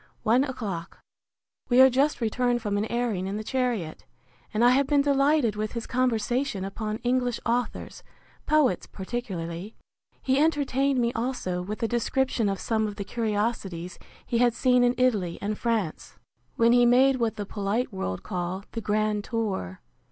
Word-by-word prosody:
One 240 +5 +4
o'clock. 210 -11 -5 0.7
We 245 0 +4
are 260 - +10
just 275 +2 +1
returned 240 +2 +1
from 205 -2 -1
an 205 +1 0
airing 225 -5 -1
in 200 +2 -3
the 215 - -4
chariot; 235 - -2 0.5
and 220 +3 +2
I 245 - +7
have 270 +1 +3
been 285 -1 +3
delighted 280 -4 +2
with 215 0 -3
his 235 -2 -4
conversation 245 -3 0
upon 215 +2 -4
English 245 -1 0
authors, 245 +1 -2 0.5
poets 300 -4 +2
particularly. 190 -3 -5 0.5
He 265 +1 +2
entertained 280 -3 +2
me 235 0 +1
also 225 -7 -2
with 210 +5 -5
a - - +2
description 240 -1 0
of 195 -1 -2
some 220 -1 0
of 205 - -6
the 200 - -4
curiosities 205 -6 -2 0.3
he 235 - 0
had 240 -1 +3
seen 250 -1 +3
in 245 0 +3
Italy 210 -9 +1
and 210 +1 -2
France, 220 -8 -2 0.4
when 230 0 +4
he 245 0 +5
made 260 +2 +5
what 230 -3 0
the 205 - -4
polite 205 +4 -2
world 95 - -4
call 180 0 -4
the 230 - -4
grand 210 0 0
tour. 200 - -3
230 Hz, 165 wpm, -26 LUFS, 205-250 Hz, 0.7 s, are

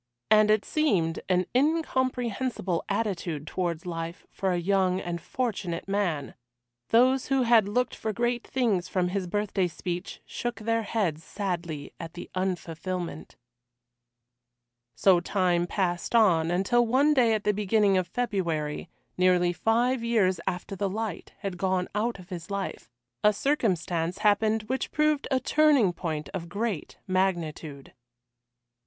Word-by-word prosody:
And 215 0 +6
it 215 -1 +3
seemed 190 - +1
an 180 0 +3
incomprehensible 255 - 0
attitude 185 -8 -2
towards 170 -1 -3
life 170 +1 -5
for 190 -1 -1
a 180 - +1
young 185 +1 +2
and 170 -2 -4
fortunate 200 -10 -3
man. 180 -8 -1 0.6
Those 255 +3 +4
who 270 -2 +2
had 230 -4 +5
looked 250 +4 0
for 220 - -3
great 240 +2 -1
things 215 -9 0
from 180 -2 0
his 190 -1 -2
birthday 200 -1 0
speech 175 +1 -5
shook 240 0 -4
their 230 +1 0
heads 195 -8 -1
sadly 170 -7 -4
at 165 0 -8
the 175 - -8
unfulfilment. 180 -2 -4 1.6
So 180 +9 +5
time 175 -2 +1
passed 180 +2 -1
on, 170 -8 +4
until 195 +8 +3
one 265 +6 +3
day 235 -5 +4
at 210 - -3
the 210 - +2
beginning 205 0 +2
of 185 -1 +1
February, 170 -9 -2 0.3
nearly 180 -1 +4
five 235 +5 +1
years 205 -7 +2
after 180 +2 -3
the 195 +1 -1
light 215 -2 -4
had 190 -3 -4
gone 185 -1 0
out 220 +2 -1
of 180 -1 -14
his 180 -1 -7
life, 200 -10 -4 0.3
a 210 - +6
circumstance 185 - 0
happened 215 +1 +2
which 260 +5 -2
proved 305 -1 +1
a 265 -2 +2
turning 280 -8 +4
point 155 -3 -4
of 170 -3 -6
great 200 -3 -3
magnitude. 170 -6 -2
195 Hz, 140 wpm, -27 LUFS, 175-230 Hz, 1.6 s, And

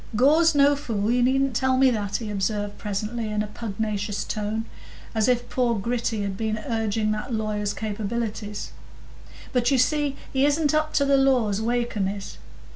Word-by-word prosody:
"Gore's 310 +7 +5
no 285 0 +5
fool; 225 -6 -1
you 245 +1 +2
needn't 265 0 +2
tell 260 +1 +2
me 265 0 +5
that," 205 -3 -2
he 220 -3 -2
observed 205 +1 -2
presently, 215 +2 -3
in 210 0 0
a - - -3
pugnacious 210 -1 -3
tone, 215 +1 -3 0.5
as 220 0 +2
if 245 -1 +1
poor 245 -2 +1
Gritty 225 0 -1
had 200 -1 -3
been 220 +1 -1
urging 220 -2 0
that 215 +4 -3
lawyer's 210 -2 -1
capabilities; 215 0 -4 0.8
"but, 245 -1 +2
you 275 - +3
see, 290 +2 +2 0.2
he 265 0 +2
isn't 290 +1 +2
up 310 0 +1
to 280 - +4
the 275 0 +4
law 265 -5 +3
as 205 +1 -1
Wakem 235 -4 0
is. 195 0 -6
225 Hz, 175 wpm, -25 LUFS, 210-260 Hz, 0.8 s, Gore's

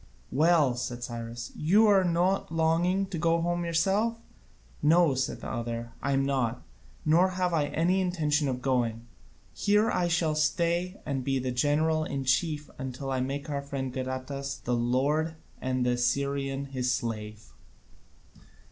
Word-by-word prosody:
"Well," 155 -2 +4
said 120 -1 -4
Cyrus, 120 0 -6
"are - - -14
you 200 +4 +5
not 175 +1 +1
longing 165 +4 +2
to 190 -4 -5
go 165 0 +2
home 175 +1 -1
yourself?" 195 +7 +1 0.6
"No," 160 0 +5
said 130 0 -2
the - - -6
other. 115 0 -4
"I 140 - 0
am 135 0 +2
not. 125 -3 -1 0.4
Nor 170 +4 +4
have 180 -1 -1
I 155 -3 +2
any 175 +6 +1
intention 155 -5 +1
of 125 -1 -3
going: 120 -3 0 0.5
here 210 +2 +2
I 175 - +1
shall 165 -2 +1
stay 170 +5 0
and 135 -3 -2
be 135 0 0
general 155 +5 +2
in 140 -3 -3
chief 150 +3 +1
until 130 0 -5
I 130 - 0
make 140 +2 -3
our 145 -2 -2
friend 135 -2 -4
Gadatas 130 +1 -4
the 125 - -1
lord 140 +7 +1 0.3
and 130 -1 0
the 125 - +2
Assyrian 140 +2 0
his 130 -2 -1
slave." 110 -2 -4
145 Hz, 150 wpm, -28 LUFS, 130-170 Hz, 0.6 s, you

